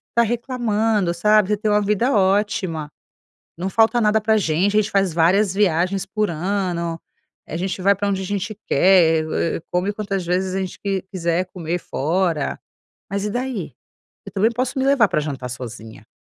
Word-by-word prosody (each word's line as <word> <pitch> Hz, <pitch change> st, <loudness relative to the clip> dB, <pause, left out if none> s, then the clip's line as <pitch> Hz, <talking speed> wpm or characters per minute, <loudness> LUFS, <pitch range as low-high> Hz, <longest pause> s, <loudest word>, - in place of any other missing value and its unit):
"tá 235 Hz, -, +5 dB
reclamando, 225 Hz, -4 st, 0 dB
sabe, 210 Hz, +3 st, +3 dB
você 210 Hz, -, +1 dB
tem 215 Hz, +1 st, -1 dB
uma 210 Hz, 0 st, +3 dB
vida 210 Hz, +6 st, +1 dB
ótima, 190 Hz, -6 st, 0 dB, 0.6 s
não 180 Hz, +3 st, -3 dB
falta 225 Hz, +4 st, +3 dB
nada 215 Hz, 0 st, +3 dB
pra 220 Hz, +1 st, +1 dB
a 220 Hz, -, +4 dB
gente, 190 Hz, +3 st, +1 dB
a 215 Hz, -, +5 dB
gente 210 Hz, -, -4 dB
faz 195 Hz, -3 st, +1 dB
várias 180 Hz, +4 st, +3 dB
viagens 190 Hz, -1 st, +1 dB
por 210 Hz, -1 st, -1 dB
ano, 170 Hz, -1 st, -2 dB, 0.5 s
a 160 Hz, -, -6 dB
gente 185 Hz, +1 st, -3 dB
vai 200 Hz, +2 st, +5 dB
pra 205 Hz, +1 st, -1 dB
onde 195 Hz, -1 st, -1 dB
a -, -, -4 dB
gente 205 Hz, +2 st, -3 dB
quer, 165 Hz, -1 st, +4 dB
eh, 165 Hz, -, -1 dB
come 185 Hz, +3 st, 0 dB
quantas 200 Hz, -3 st, -3 dB
vezes 185 Hz, +2 st, -1 dB
a -, -, 0 dB
gente 190 Hz, -1 st, -5 dB
qu 200 Hz, -, -4 dB, 0.2 s
quiser 170 Hz, 0 st, 0 dB
comer 170 Hz, -1 st, -3 dB
fora, 165 Hz, +1 st, -1 dB, 0.5 s
mas 200 Hz, +2 st, -2 dB
e 210 Hz, -, -2 dB
daí? 245 Hz, -, -3 dB, 0.5 s
Eu -, -, -9 dB
também 210 Hz, +4 st, +2 dB
posso 255 Hz, +3 st, -2 dB
me 265 Hz, -, +1 dB
levar 275 Hz, -5 st, +5 dB
pra 170 Hz, -4 st, 0 dB
jantar 135 Hz, -4 st, -5 dB
sozinha, 115 Hz, -3 st, -9 dB
195 Hz, 185 wpm, -21 LUFS, 170-210 Hz, 0.6 s, tá